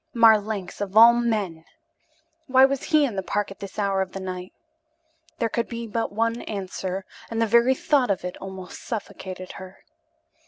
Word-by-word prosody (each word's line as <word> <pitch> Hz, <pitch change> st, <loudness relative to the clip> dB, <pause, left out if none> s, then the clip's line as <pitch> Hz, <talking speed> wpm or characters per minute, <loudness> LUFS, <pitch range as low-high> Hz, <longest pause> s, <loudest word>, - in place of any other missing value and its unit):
Marlanx, 215 Hz, -4 st, +3 dB
of 200 Hz, +1 st, -2 dB
all 230 Hz, +1 st, +10 dB
men! 215 Hz, -9 st, -1 dB, 0.8 s
Why 260 Hz, 0 st, +6 dB
was 275 Hz, 0 st, -1 dB
he 305 Hz, -3 st, +4 dB
in 235 Hz, -7 st, -3 dB
the 190 Hz, -, -1 dB
park 205 Hz, +2 st, -2 dB
at 195 Hz, -, -11 dB
this 200 Hz, -1 st, -9 dB
hour 200 Hz, -2 st, +1 dB
of 190 Hz, -1 st, -4 dB
the 195 Hz, -, -5 dB
night? 185 Hz, -1 st, -6 dB, 0.9 s
There 230 Hz, -, +1 dB
could 235 Hz, +1 st, -2 dB
be 235 Hz, 0 st, -5 dB
but 230 Hz, +1 st, -2 dB
one 230 Hz, +3 st, 0 dB
answer, 190 Hz, -1 st, -4 dB, 0.2 s
and 225 Hz, -, -3 dB
the 230 Hz, -, +3 dB
very 235 Hz, +4 st, +4 dB
thought 270 Hz, -3 st, +2 dB
of 190 Hz, -2 st, -1 dB
it 180 Hz, -, -4 dB
almost 190 Hz, -1 st, -9 dB
suffocated 190 Hz, -4 st, -6 dB
her. 185 Hz, 0 st, -11 dB
210 Hz, 180 wpm, -24 LUFS, 190-235 Hz, 0.9 s, all